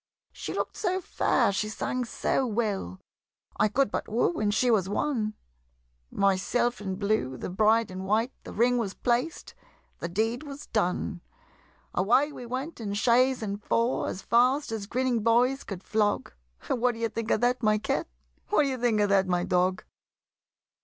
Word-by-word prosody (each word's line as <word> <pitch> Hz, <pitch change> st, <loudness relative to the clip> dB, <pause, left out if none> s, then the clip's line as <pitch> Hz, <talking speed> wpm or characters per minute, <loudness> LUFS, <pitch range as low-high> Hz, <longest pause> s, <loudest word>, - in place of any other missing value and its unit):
She -, -, -6 dB
look'd -, -, -2 dB
so 370 Hz, -2 st, 0 dB
fair, 360 Hz, -, +1 dB
she 210 Hz, +2 st, -1 dB
sang 250 Hz, +3 st, -2 dB
so 250 Hz, -, 0 dB
well, 205 Hz, -, -2 dB, 0.6 s
I -, -, +4 dB
could 230 Hz, +1 st, +1 dB
but -, -, -3 dB
woo 240 Hz, +10 st, 0 dB
and 210 Hz, -1 st, +1 dB
she 245 Hz, +4 st, +2 dB
was 195 Hz, -4 st, +2 dB
won, 215 Hz, -2 st, -1 dB, 0.7 s
Myself 200 Hz, +5 st, +1 dB
in 190 Hz, -2 st, -3 dB
blue, 200 Hz, -11 st, -1 dB
the -, -, -5 dB
bride 220 Hz, +2 st, +3 dB
in 185 Hz, 0 st, -6 dB
white, 220 Hz, +5 st, +1 dB
The -, -, -9 dB
ring 245 Hz, +2 st, +2 dB
was 200 Hz, -4 st, -3 dB
placed, 250 Hz, +7 st, -1 dB, 0.5 s
the -, -, -3 dB
deed 225 Hz, +7 st, 0 dB
was 285 Hz, -1 st, -8 dB
done! 180 Hz, -, -1 dB, 0.7 s
Away 245 Hz, +11 st, +3 dB
we 250 Hz, -4 st, -9 dB
went 260 Hz, +3 st, -5 dB
in 200 Hz, -2 st, -3 dB
chaise 250 Hz, +3 st, +3 dB
and 205 Hz, 0 st, -4 dB
four, 235 Hz, +2 st, +1 dB
As 190 Hz, -, -5 dB
fast 250 Hz, +4 st, +3 dB
as 215 Hz, -3 st, -4 dB
grinning 250 Hz, 0 st, 0 dB
boys 245 Hz, +5 st, +3 dB
could 190 Hz, -2 st, -7 dB
flog 210 Hz, -, 0 dB, 0.3 s
What 245 Hz, 0 st, +1 dB
d'ye 230 Hz, 0 st, -1 dB
think 225 Hz, 0 st, -5 dB
of -, -, +2 dB
that, 245 Hz, +1 st, +2 dB
my 215 Hz, -2 st, +3 dB
Cat? 210 Hz, -, -1 dB, 0.4 s
What -, -, +3 dB
d'ye 270 Hz, -2 st, -1 dB
think 235 Hz, -3 st, +2 dB
of 205 Hz, -, +2 dB
that, 195 Hz, -1 st, +3 dB
my 175 Hz, -1 st, +1 dB
Dog? 180 Hz, +1 st, +1 dB
225 Hz, 170 wpm, -27 LUFS, 200-245 Hz, 0.7 s, I